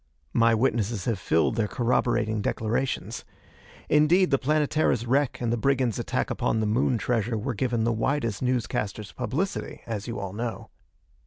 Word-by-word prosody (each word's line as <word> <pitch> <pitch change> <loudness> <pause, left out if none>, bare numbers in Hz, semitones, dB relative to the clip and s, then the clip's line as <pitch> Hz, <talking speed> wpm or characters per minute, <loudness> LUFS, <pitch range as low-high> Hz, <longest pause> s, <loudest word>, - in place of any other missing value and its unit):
My 115 0 +4
witnesses 110 -4 0
have 115 -5 0
filed 85 +6 +1
their 110 -2 +1
corroborating 120 -2 +1
declarations. 115 +6 -2 0.6
Indeed, 165 +5 +4
the 135 - +3
Planetara's 150 -4 +1
wreck 135 +2 +1
and 120 -1 0
the - - 0
brigands' 130 -2 +1
attack - - -1
upon 110 - 0
the 110 - +1
Moon 115 +3 +2
treasure 115 0 0
were 120 +5 -2
given 120 0 0
the 115 0 +2
widest 115 -2 -1
news 125 -2 +1
casters' 105 -1 -4
publicity, 180 +10 -3
as 110 -2 -4
you 115 - -4
all 95 -1 -5
know. 115 +2 -4
120 Hz, 160 wpm, -26 LUFS, 110-130 Hz, 0.6 s, My